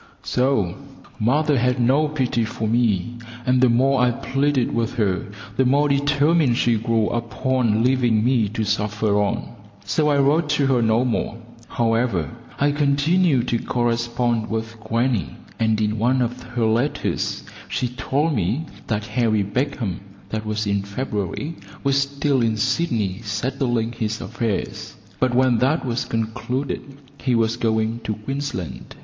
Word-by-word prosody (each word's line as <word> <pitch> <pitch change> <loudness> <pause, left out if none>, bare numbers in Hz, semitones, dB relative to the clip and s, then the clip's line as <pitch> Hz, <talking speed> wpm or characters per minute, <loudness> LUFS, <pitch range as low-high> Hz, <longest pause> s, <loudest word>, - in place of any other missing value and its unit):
So! 125 -9 +1 0.4
Mother 145 +5 +2
had 125 +1 +1
no 135 +6 +3
pity 130 -5 0
for 110 0 -3
me, 115 -1 +1 0.3
and 125 0 +3
the 130 - +5
more 130 +2 +3
I 125 - +4
pleaded 135 +2 0
with 115 +1 -1
her 100 -6 0 0.3
the 130 - +4
more 140 +3 +3
determined 145 -1 +3
she 120 -1 +3
grew 115 -1 +1
upon 115 -1 0
leaving 120 -4 +2
me 120 -5 +2
to 110 +1 -2
suffer 105 0 +1
on, 100 - -2 0.4
so 150 -1 +1
I 145 - +3
wrote 145 +3 +3
to 140 - +2
her 130 -3 +3
no 115 +2 +3
more. 115 -1 -1 0.3
However, 115 - 0 0.3
I 145 +1 +3
continued 145 -1 +2
to 120 - +1
correspond 120 -1 0
with 110 0 -4
grannie, 115 - -1 0.2
and 110 -1 +2
in 105 0 0
one 125 +3 +2
of 125 +1 -4
her 120 -2 -2
letters 115 +6 0 0.3
she 125 - -1
told 140 +5 0
me 110 - 0 0.2
that 110 -2 -1
Harry 110 -2 +1
Beecham 115 - -2 0.3
(that 110 0 -4
was 105 0 -1
in 100 -1 +1
February) 105 - -4 0.3
was 140 0 +3
still 140 -1 0
in 110 -2 +1
Sydney 115 - 0
settling 120 +2 -1
his 110 -2 -3
affairs; 115 -3 -3 0.2
but 130 -1 +1
when 125 -2 +4
that 135 +6 +1
was 120 -1 -1
concluded 115 +4 -2 0.4
he 125 -3 +1
was 115 0 +2
going 110 -1 0
to 110 - -1
Queensland. 130 - -5
120 Hz, 150 wpm, -22 LUFS, 110-135 Hz, 0.4 s, the